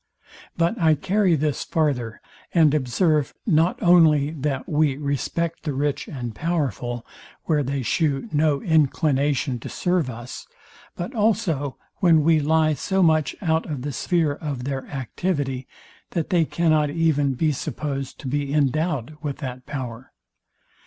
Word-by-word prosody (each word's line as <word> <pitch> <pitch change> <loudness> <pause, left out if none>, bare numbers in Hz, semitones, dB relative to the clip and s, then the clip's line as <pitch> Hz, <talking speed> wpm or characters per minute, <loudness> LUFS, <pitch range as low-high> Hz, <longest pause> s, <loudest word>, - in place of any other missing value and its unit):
But 170 +7 +1
I 160 -1 +5
carry 190 +3 +2
this 150 -1 -1
farther, 135 -8 -1 0.3
and 155 -4 +5
observe, 150 +2 +1
not 165 -2 +2
only 160 -5 +5
that 140 -3 -3
we 150 -3 +1
respect 150 +4 -2
the 150 - -3
rich 145 +1 -1
and 120 -6 -5
powerful, 125 - -2 0.4
where 155 -3 +1
they 135 0 -2
shew 145 - 0
no 150 -2 +1
inclination 145 -4 +1
to - - -7
serve 175 -6 0
us, 120 +1 -8 0.5
but 175 +9 -5
also 175 - 0 0.2
when 165 -5 +4
we 160 0 +4
lie 155 +1 +2
so 190 +7 0
much 155 -3 +2
out 160 -1 +1
of 140 -5 -4
the 145 0 -3
sphere 165 +1 +1
of 145 -4 -5
their 135 0 -4
activity, 135 -1 -3 0.5
that 170 -4 -2
they 170 -3 +3
cannot 155 -2 +2
even 145 -3 +1
be 155 +5 +1
supposed 140 -1 -4
to 135 - -6
be 140 +1 -1
endowed 150 0 0
with 145 -3 -4
that 130 -3 -7
power. 125 -3 -6
150 Hz, 145 wpm, -23 LUFS, 135-160 Hz, 0.5 s, I